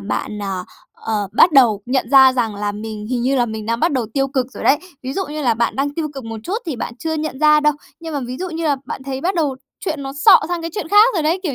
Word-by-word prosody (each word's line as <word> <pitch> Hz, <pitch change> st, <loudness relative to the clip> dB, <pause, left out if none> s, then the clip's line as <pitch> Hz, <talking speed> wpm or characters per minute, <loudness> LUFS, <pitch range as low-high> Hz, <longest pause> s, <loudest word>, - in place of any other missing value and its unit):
bạn, 115 Hz, -, -4 dB
à, 190 Hz, -2 st, -3 dB, 0.3 s
ờ, 210 Hz, -3 st, -3 dB
bắt 345 Hz, -, +5 dB
đầu 240 Hz, -8 st, +5 dB
nhận 260 Hz, +2 st, -1 dB
ra 265 Hz, -2 st, +7 dB
rằng 235 Hz, -4 st, -1 dB
là 205 Hz, 0 st, -3 dB
mình 210 Hz, 0 st, -7 dB
hình 245 Hz, 0 st, -2 dB
như 265 Hz, +2 st, +1 dB
là 245 Hz, -2 st, +2 dB
mình 220 Hz, -1 st, -6 dB
đang 230 Hz, +1 st, -1 dB
bắt 330 Hz, -, +2 dB
đầu 250 Hz, -5 st, -1 dB
tiêu 270 Hz, 0 st, +1 dB
cực 260 Hz, -2 st, -1 dB
rồi -, -, -8 dB
đấy, 285 Hz, -, +4 dB, 0.2 s
ví 260 Hz, +1 st, -4 dB
dụ 385 Hz, +3 st, -2 dB
như 300 Hz, +1 st, -5 dB
là 240 Hz, -4 st, +2 dB
bạn 235 Hz, +1 st, -1 dB
đang 285 Hz, +1 st, -1 dB
tiêu 315 Hz, -1 st, -2 dB
cực 270 Hz, -3 st, -7 dB
một 225 Hz, -1 st, -6 dB
chút 380 Hz, -, -2 dB
thì 305 Hz, -6 st, -3 dB
bạn 235 Hz, -, -5 dB
chưa 320 Hz, +3 st, -2 dB
nhận 310 Hz, -3 st, -4 dB
ra 300 Hz, 0 st, +5 dB
đâu. 300 Hz, 0 st, +3 dB, 0.3 s
Nhưng 325 Hz, -2 st, -6 dB
mà 285 Hz, -, -1 dB
ví 250 Hz, +1 st, -5 dB
dụ 370 Hz, 0 st, -4 dB
như 330 Hz, 0 st, -4 dB
là 290 Hz, -3 st, +2 dB
bạn -, -, -6 dB
thấy 265 Hz, 0 st, -5 dB
bắt 370 Hz, +6 st, -1 dB
đầu 295 Hz, -6 st, 0 dB, 0.3 s
chuyện 315 Hz, -6 st, -3 dB
nó 270 Hz, 0 st, -5 dB
xọ 285 Hz, -, +6 dB
sang 350 Hz, -1 st, -2 dB
cái 330 Hz, -, -4 dB
chuyện 410 Hz, -, -4 dB
khác 420 Hz, +5 st, +5 dB
rồi 335 Hz, -, 0 dB
đấy, 325 Hz, +5 st, +1 dB
kiểu 310 Hz, -8 st, -2 dB
270 Hz, 295 wpm, -19 LUFS, 230-315 Hz, 0.3 s, ra